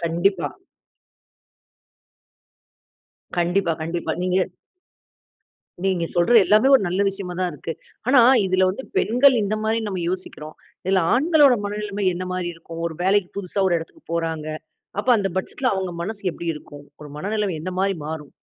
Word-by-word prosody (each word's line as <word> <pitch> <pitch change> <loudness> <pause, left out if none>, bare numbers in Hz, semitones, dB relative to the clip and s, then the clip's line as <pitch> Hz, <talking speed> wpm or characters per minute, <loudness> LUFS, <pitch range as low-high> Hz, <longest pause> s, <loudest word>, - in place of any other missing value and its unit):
கண்டிப்பா. 175 +2 +1 2.9
கண்டிப்பா 175 0 +1
கண்டிப்பா 165 0 -2
நீங்க 185 0 +1 1.5
நீங்க 185 -3 +1
சொல்ற 175 +7 +3
எல்லாமே 215 +8 +4
ஒரு 260 - +5
நல்ல 185 +3 -1
விஷயமா 190 -2 -5
தான் 180 - 0
இருக்கு. 155 +3 -5 0.4
ஆனா 260 -2 +7 0.3
இதுல 185 0 +3
வந்து 265 +8 -6
பெண்கள் 250 +4 +5
இந்த 210 +2 -1
மாரி 220 +1 +1
நம்ம 190 -2 -3
யோசிக்கிறோம். 155 -4 -7 0.3
இதுல 190 -1 +2
ஆண்களோட 295 0 +5
மனநிலைமை 205 -1 -3
என்ன 185 +1 -4
மாரி 180 -1 -2
இருக்கும்? 165 0 -9
ஒரு 160 -2 -5
வேலைக்கு 195 -1 +2
புதுசா 195 +1 -2
ஒரு 175 - +2
இடத்துக்குப் 165 0 -12
போறாங்க. 165 -2 -2 0.5
அப்ப 235 - -10
அந்தப் 195 -3 -2
பட்ஜெட்ல 250 +6 -2
அவுங்க 190 -2 -2
மனசு 205 +2 -5
எப்பிடி 170 -1 -3
இருக்கும்? 145 -1 -12 0.2
ஒரு 150 -1 -10
மனநிலைமை 205 -1 -1
எந்த 185 +1 -4
மாதிரி 195 -1 +1
மாறும்? 155 -2 -6
185 Hz, 145 wpm, -22 LUFS, 170-205 Hz, 2.9 s, ஆனா